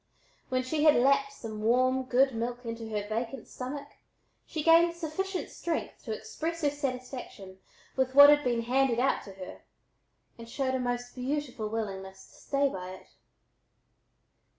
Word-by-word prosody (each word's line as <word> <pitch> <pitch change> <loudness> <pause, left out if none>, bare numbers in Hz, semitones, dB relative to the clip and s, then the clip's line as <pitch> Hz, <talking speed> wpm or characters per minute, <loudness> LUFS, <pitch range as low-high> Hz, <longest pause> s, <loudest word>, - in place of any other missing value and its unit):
When 255 0 0
she 295 +4 -1
had 305 -1 +7
lapped 275 +2 +3
some 225 -6 -8
good 255 +3 +3
warm 225 - -5
milk 245 +1 -4
into 230 -1 -5
her 210 -1 -3
vacant 230 +3 -4
stomach 280 +3 -6 0.6
she 310 - -3
gained 335 +1 +6
sufficient 360 +4 -3
strength 335 -2 -4
to 225 - -4
express 320 +10 -4
her 290 - +3
satisfaction 255 -8 -6 0.4
with 260 0 0
what 285 +1 +11
had 295 0 +4
been 240 -2 0
"handed 250 0 +2
out 265 - +2
to 195 - -10
her," 185 -1 -9 0.8
and 230 0 -10
showed 260 +1 -1
a 260 - 0
most 245 0 -3
beautiful 255 -4 -3
willingness 195 -3 -5
to - - -22
stay 280 0 +1
by 185 -7 -6
it. - - -17
255 Hz, 155 wpm, -29 LUFS, 230-280 Hz, 0.8 s, what